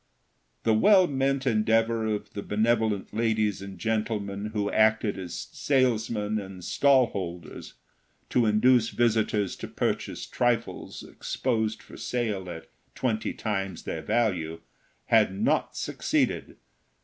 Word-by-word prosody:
The 110 - +3
well 190 - +6
meant 135 -2 0
endeavor 115 -1 +2
of 105 -1 -3
the 100 - -4
benevolent 110 -1 0
ladies 110 -3 +1
and 100 -1 -8
gentlemen 105 0 -2
who 105 -2 -2
acted 110 -2 +2
as 90 -2 -6
salesmen 110 -5 +1
and 95 -2 -9
stall 135 +5 +4
holders 90 -3 -6 0.6
to 120 -3 +3
induce 115 +2 +4
visitors 110 -4 +1
to - - -6
purchase - - -2
trifles 120 -1 -1
exposed 110 -4 -2
for - - -13
sale 105 -7 -2
at 80 -2 -7 0.3
twenty 115 -4 -1
times 95 -4 -3
their - - -4
value 90 -8 0 0.4
had 105 -4 +3
not - - +1
succeeded. - - -1
110 Hz, 120 wpm, -27 LUFS, 100-115 Hz, 0.6 s, well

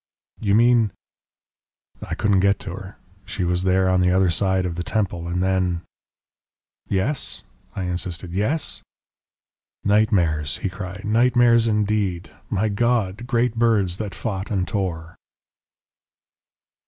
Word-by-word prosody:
"You 100 -2 +2
mean?" 115 -3 +4 1.1
"I - - -4
couldn't 100 -2 +2
get 100 +1 +3
to 90 - -6
her. 95 +1 -9 0.3
She 95 - -3
was 90 +1 0
there 95 0 +3
on 95 0 +3
the 90 - +3
other 95 -1 +3
side 95 +1 +1
of 90 - -2
the 85 - -4
Temple 90 -4 -2
And 90 +1 -1
then 90 -2 0 0.5
" - - -47
"Yes," 135 +8 -3 0.3
I 95 - -3
insisted. 90 0 -4
"Yes?" 110 - -1 1.0
"Nightmares," 90 -8 +2
he 95 - -2
cried; 95 +1 -7
"nightmares 115 +1 +4
indeed! 105 -4 0 0.2
My 110 +3 +1
God! 115 0 0
Great 120 -2 +1
birds 110 -6 +2
that 100 -4 -5
fought 100 -2 -4
and 95 -4 -1
tore." 85 -4 -3
95 Hz, 130 wpm, -22 LUFS, 90-110 Hz, 1.1 s, mean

